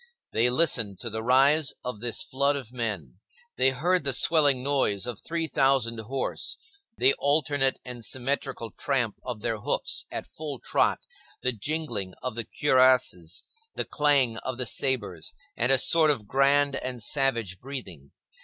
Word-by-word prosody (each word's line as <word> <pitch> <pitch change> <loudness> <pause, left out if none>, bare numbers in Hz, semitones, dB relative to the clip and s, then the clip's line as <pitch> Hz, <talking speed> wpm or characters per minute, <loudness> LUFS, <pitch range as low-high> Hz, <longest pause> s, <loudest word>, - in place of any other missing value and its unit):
They 115 +3 +3
listened 125 - +2
to 115 - -4
the 110 +1 -4
rise 135 +5 +3
of 125 -4 -4
this 120 +10 0
flood 140 -1 +1
of 130 -4 -7
men. 100 - -4 0.4
They - - +4
heard 165 +6 0
the 140 -1 +3
swelling 145 -6 +3
noise 130 -8 +1
of 120 -4 -6
three 165 0 -3
thousand 135 -6 +1
horse, 130 +5 -3 0.4
the 130 +2 +5
alternate 145 -2 +2
and 125 -2 -8
symmetrical 130 -1 -2
tramp 120 -5 -1
of 120 -4 -6
their 110 -2 -2
hoofs - - -1
at - - -5
full 150 -3 -7
trot, - - 0 0.4
the 125 - +2
jingling 115 - -3
of 125 - -3
the 115 0 -4
cuirasses, 130 - +2 0.3
the - - -2
clang 140 -6 +2
of 130 +1 -5
the 125 - -1
sabres 105 - -2 0.2
and 125 - +1
a 135 - +7
sort 160 +4 +4
of 125 -8 0
grand 140 +2 +2
and 125 -3 -5
savage 115 -9 0
breathing. 95 - -8
130 Hz, 155 wpm, -26 LUFS, 115-140 Hz, 0.4 s, a